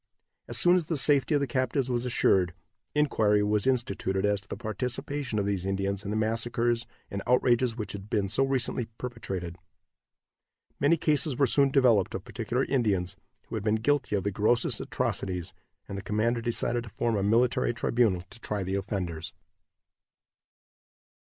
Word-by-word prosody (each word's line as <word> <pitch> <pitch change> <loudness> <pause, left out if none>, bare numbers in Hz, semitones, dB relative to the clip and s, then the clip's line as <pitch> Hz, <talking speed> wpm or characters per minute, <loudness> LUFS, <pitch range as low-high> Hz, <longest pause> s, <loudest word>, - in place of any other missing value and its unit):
As - - -3
soon 175 +1 +5
as 180 -3 +1
the 160 0 -1
safety 145 +2 +3
of 145 - +2
the - - +2
captives 130 0 0
was 120 -1 -1
assured, 90 -7 +2 0.4
inquiry 110 -8 +3
was 105 +2 +1
instituted 120 -7 0
as 105 -1 +1
to 100 - -17
the - - -5
participation 125 +2 -3
of 100 - +1
these 100 -3 -1
Indians 95 +1 -1
in 100 - -5
the 105 - -1
massacres 115 +2 0 0.2
and 100 - -3
outrages 125 -1 +3
which 110 - -4
had 100 +1 -8
been 105 -4 +1
so 105 +7 +1
recently 130 -3 0
perpetrated. 95 -8 -5 1.2
Many 150 +4 +4
cases 150 -3 +1
were 140 - +4
soon 140 +2 +3
developed 125 -8 +3
of 95 - -5
particular 120 +3 -2
Indians, 100 -9 0 0.3
who - - -9
had 110 - -3
been 110 0 +2
guilty 125 0 +1
of 100 - -1
the 100 - -1
grossest 110 +5 +1
atrocities, 90 -3 -3 0.3
and 100 - -5
the - - -6
commander 115 +4 0
decided 120 0 0
to - - -9
form 115 +2 -1
a 100 - 0
military 115 +6 +2
tribunal 115 -6 +1
to - - -8
try 105 -4 -3
the 95 +1 -3
offenders. 95 -5 -3
115 Hz, 170 wpm, -28 LUFS, 100-125 Hz, 1.2 s, soon